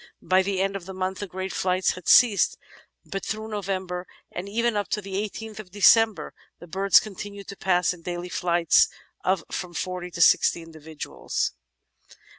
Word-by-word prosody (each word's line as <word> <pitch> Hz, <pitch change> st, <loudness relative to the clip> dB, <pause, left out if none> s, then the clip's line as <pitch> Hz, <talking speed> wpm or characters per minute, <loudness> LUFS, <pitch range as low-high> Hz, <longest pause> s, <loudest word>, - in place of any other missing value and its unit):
By 185 Hz, 0 st, +4 dB
the 190 Hz, 0 st, -1 dB
end 195 Hz, 0 st, -1 dB
of 190 Hz, -2 st, -6 dB
the 190 Hz, -, -7 dB
month 185 Hz, 0 st, -3 dB
the 205 Hz, -, -4 dB
great 190 Hz, +1 st, -5 dB
flights 185 Hz, 0 st, +1 dB
had 180 Hz, -2 st, -9 dB
ceased, 230 Hz, -5 st, +5 dB, 0.5 s
but 195 Hz, -, -5 dB
through 215 Hz, +1 st, -4 dB
November, 190 Hz, -3 st, -3 dB, 0.2 s
and 185 Hz, +3 st, -6 dB
even 230 Hz, +2 st, 0 dB
up 205 Hz, -1 st, -1 dB
to -, -, -1 dB
the 195 Hz, -1 st, -8 dB, 0.2 s
18th 215 Hz, -2 st, -9 dB
December, 205 Hz, -2 st, +4 dB, 0.3 s
the -, -, -11 dB
birds 195 Hz, +3 st, +4 dB
continued 200 Hz, -1 st, -8 dB
to 200 Hz, -, -7 dB
pass 180 Hz, -2 st, +1 dB
in 175 Hz, -, -13 dB
"daily 175 Hz, +1 st, -5 dB
flights 175 Hz, -2 st, +3 dB, 0.4 s
of 185 Hz, -2 st, +1 dB
from 175 Hz, -2 st, -5 dB
forty 180 Hz, 0 st, -4 dB
to 175 Hz, -, -9 dB
sixty 170 Hz, 0 st, +5 dB
individuals." 160 Hz, -1 st, -4 dB
190 Hz, 170 wpm, -25 LUFS, 180-200 Hz, 0.5 s, ceased